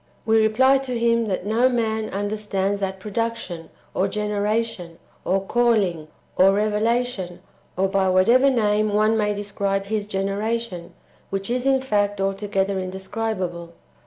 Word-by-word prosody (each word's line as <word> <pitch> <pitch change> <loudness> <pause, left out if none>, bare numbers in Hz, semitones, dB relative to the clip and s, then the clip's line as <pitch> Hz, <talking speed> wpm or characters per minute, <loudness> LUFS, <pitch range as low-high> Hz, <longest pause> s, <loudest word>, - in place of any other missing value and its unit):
we 220 0 +4
reply 260 +5 +4
to 255 -2 -3
him, 230 -1 +2
that 185 -2 -2
no 225 +4 +3
one 220 -3 -1
under 205 +2 -2
stands 200 -1 -1
that 190 -1 -3
production, 210 -5 -4 0.2
or 190 - +1
generation, 210 -3 -2 0.3
or 190 +2 +2
calling, 205 -9 +1 0.3
or 190 +1 +6
revelation, 215 -2 0 0.4
or 190 +1 +2
by 190 -1 +1
whatever 235 +9 +5
name 215 -4 +1
one 215 +2 +3
may 210 -1 +1
describe 200 -1 -2
His 210 0 -2
generation, 195 -1 -3 0.3
which 195 +3 -3
is 250 +2 0
in 265 -1 +3
fact 205 -4 0
altogether 195 0 -1
indescribable. 185 -2 -4
210 Hz, 135 wpm, -23 LUFS, 195-225 Hz, 0.4 s, or